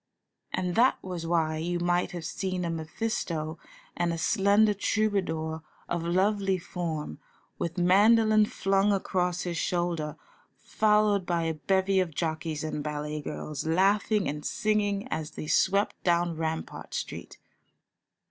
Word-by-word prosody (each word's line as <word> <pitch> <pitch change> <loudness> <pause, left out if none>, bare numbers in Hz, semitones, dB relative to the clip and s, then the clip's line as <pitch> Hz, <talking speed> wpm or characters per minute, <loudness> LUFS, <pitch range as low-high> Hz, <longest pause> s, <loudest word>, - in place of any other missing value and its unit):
And 180 -1 -1
that 245 +6 +4
was 175 -3 -5
why 160 -2 +1
you 175 +2 -2
might 175 +1 +1
have 175 -2 -6
seen 185 +1 -2
a 170 - -1
Mephisto 160 -2 -3 0.4
and 175 0 0
a 165 - -2
slender 205 +5 +3
troubadour 185 -7 -1 0.3
of 175 - -2
lovely 190 +2 +1
form, 165 - -4 0.4
with 170 +2 -3
mandolin 215 +4 +5
flung 195 +1 +1
across 180 -2 0
his 175 -2 -3
shoulder, 170 -4 -1 0.4
followed 210 -2 +2
by 170 -2 +1
a 165 0 0
bevy 190 +4 +1
of 170 -5 -1
jockeys 160 -1 -2
and 155 -1 -3
ballet 150 0 -3
girls, 150 0 -5
laughing 200 +4 +2
and 150 +1 -4
singing 205 -1 0
as 155 -1 -3
they - - -4
swept 200 +6 +1
down 175 -1 +2
Rampart 160 0 -4
Street. - - -6
175 Hz, 135 wpm, -28 LUFS, 160-200 Hz, 0.4 s, mandolin